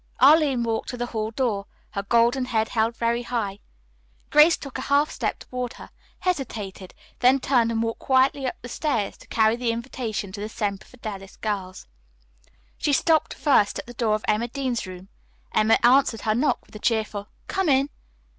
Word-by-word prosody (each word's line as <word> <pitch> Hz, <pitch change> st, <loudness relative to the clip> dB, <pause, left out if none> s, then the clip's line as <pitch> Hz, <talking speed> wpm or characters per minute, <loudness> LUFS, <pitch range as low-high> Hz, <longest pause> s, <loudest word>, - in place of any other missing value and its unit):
Arline 275 Hz, -2 st, +5 dB
walked 225 Hz, -1 st, -2 dB
to 245 Hz, -, -5 dB
the 240 Hz, -, -2 dB
hall 220 Hz, -2 st, -3 dB
door, 220 Hz, -4 st, -1 dB, 0.2 s
her 200 Hz, -, -2 dB
golden 235 Hz, +5 st, +2 dB
head 220 Hz, -3 st, 0 dB
held 230 Hz, 0 st, 0 dB
very 235 Hz, +1 st, 0 dB
high. 225 Hz, -5 st, -3 dB, 0.7 s
Grace 305 Hz, +3 st, +7 dB
took 275 Hz, -2 st, -7 dB
a 260 Hz, -, -6 dB
half 285 Hz, +2 st, +3 dB
step -, -, -2 dB
toward 250 Hz, -1 st, -5 dB
her, -, -, -12 dB, 0.3 s
hesitated, 215 Hz, -, -3 dB, 0.2 s
then 255 Hz, +3 st, +5 dB
turned 245 Hz, -3 st, +2 dB
and 225 Hz, 0 st, 0 dB
walked 230 Hz, 0 st, -3 dB
quietly 265 Hz, +1 st, +2 dB
up -, -, -3 dB
the -, -, -6 dB
stairs 240 Hz, -5 st, -1 dB
to -, -, -16 dB
carry 220 Hz, 0 st, +3 dB
the 240 Hz, -1 st, 0 dB
invitation 230 Hz, -4 st, -4 dB
to 200 Hz, -, -7 dB
the 210 Hz, -, -4 dB
Semper 200 Hz, -2 st, -3 dB
Fidelis 210 Hz, -6 st, -8 dB
girls. 195 Hz, -, -4 dB, 0.9 s
She 290 Hz, -, +1 dB
stopped 315 Hz, +2 st, +2 dB
first 265 Hz, -9 st, +3 dB
at -, -, -6 dB
the 245 Hz, -, -10 dB
door 225 Hz, -2 st, +1 dB
of 215 Hz, -, -5 dB
Emma 215 Hz, +3 st, +1 dB
Dean's 250 Hz, -4 st, -3 dB
room. 185 Hz, +1 st, -10 dB, 0.4 s
Emma 220 Hz, +1 st, +4 dB
answered 245 Hz, -2 st, +4 dB
her 215 Hz, -, +1 dB
knock 255 Hz, +7 st, 0 dB
with -, -, -19 dB
a -, -, -7 dB
cheerful 215 Hz, -3 st, -1 dB, 0.2 s
"Come 385 Hz, -4 st, 0 dB
in." 275 Hz, +1 st, +3 dB
235 Hz, 185 wpm, -24 LUFS, 215-265 Hz, 0.9 s, Grace